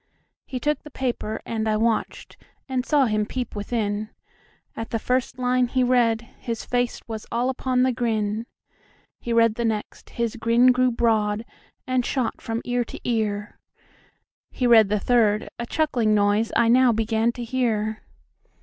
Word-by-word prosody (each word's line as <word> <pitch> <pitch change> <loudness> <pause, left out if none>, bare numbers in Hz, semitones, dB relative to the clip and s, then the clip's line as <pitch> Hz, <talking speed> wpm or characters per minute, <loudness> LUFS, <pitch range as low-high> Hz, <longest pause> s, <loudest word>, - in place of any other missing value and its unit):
He 255 - -4
took 295 +4 0
the 300 - -12
paper, 245 -5 -3
and 220 -1 -2
I 215 - +2
watched, 225 0 -1 0.3
And 260 -2 -1
saw 285 0 +3
him 215 -2 +1
peep 245 +2 -5
within; 210 0 -2 0.7
At 225 - -5
the 230 - -1
first 250 +2 -1
line 250 0 +2
he 255 +1 +1
read, 240 -3 +3 0.2
his 230 -2 -4
faceWas 240 -3 -3
all 245 +3 +1
upon 255 -1 0
the 260 - +3
grin. 225 -2 -1 0.7
He 240 - -5
read 230 -1 +4
the 235 - -3
next; 220 -2 -3
the 235 -1 -1
grin 235 +2 +5
grew 255 0 +3
broad, 220 -2 +1 0.4
And 255 -2 +1
shot 255 -1 -2
from 225 0 -4
ear 245 0 0
to - - -9
ear; 215 -3 -2 0.9
He 250 - -2
read 225 -4 +6
the 210 0 +1
third; 215 -2 +2
a 235 - -4
chuckling 245 -9 +1
noiseI 210 +3 +2
now 255 0 +5
began 225 +1 +1
to 240 - -6
hear. 220 -3 -1
235 Hz, 160 wpm, -24 LUFS, 220-250 Hz, 0.9 s, read